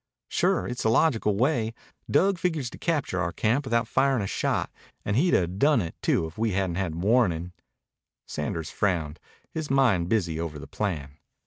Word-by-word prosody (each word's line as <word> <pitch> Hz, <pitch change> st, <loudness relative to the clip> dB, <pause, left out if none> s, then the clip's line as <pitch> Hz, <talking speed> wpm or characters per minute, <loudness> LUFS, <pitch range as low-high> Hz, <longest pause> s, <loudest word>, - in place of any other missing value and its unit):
"Sure. -, -, +1 dB
It's 125 Hz, -, -4 dB
the 110 Hz, -, +2 dB
logical 115 Hz, -5 st, +3 dB
way. 120 Hz, -3 st, +1 dB, 0.3 s
Dug 185 Hz, +5 st, +3 dB
figures 160 Hz, -9 st, -1 dB
to -, -, -11 dB
capture 150 Hz, -, -1 dB
our 85 Hz, -1 st, -1 dB
camp 120 Hz, +9 st, 0 dB
without 115 Hz, -2 st, +1 dB
firin' 130 Hz, -2 st, +2 dB
a -, -, -2 dB
shot. -, -, -1 dB, 0.3 s
And 105 Hz, -, 0 dB
he'd 170 Hz, +8 st, +3 dB
'a' 90 Hz, -, +3 dB
done 120 Hz, -, +2 dB
it, 85 Hz, -5 st, -3 dB
too, -, -, +2 dB
if 80 Hz, +5 st, -9 dB
we 110 Hz, -2 st, +1 dB
hadn't 95 Hz, -2 st, -1 dB
had 95 Hz, -5 st, -2 dB
warnin'." 90 Hz, -3 st, +1 dB, 0.7 s
Sanders 75 Hz, +1 st, -4 dB
frowned, 85 Hz, -7 st, -1 dB, 0.3 s
his 160 Hz, -2 st, -4 dB
mind 120 Hz, -11 st, +3 dB
busy 85 Hz, -8 st, 0 dB
over 80 Hz, -2 st, -4 dB
the 75 Hz, -, -8 dB
plan. 75 Hz, -9 st, -4 dB
105 Hz, 180 wpm, -26 LUFS, 85-130 Hz, 0.7 s, logical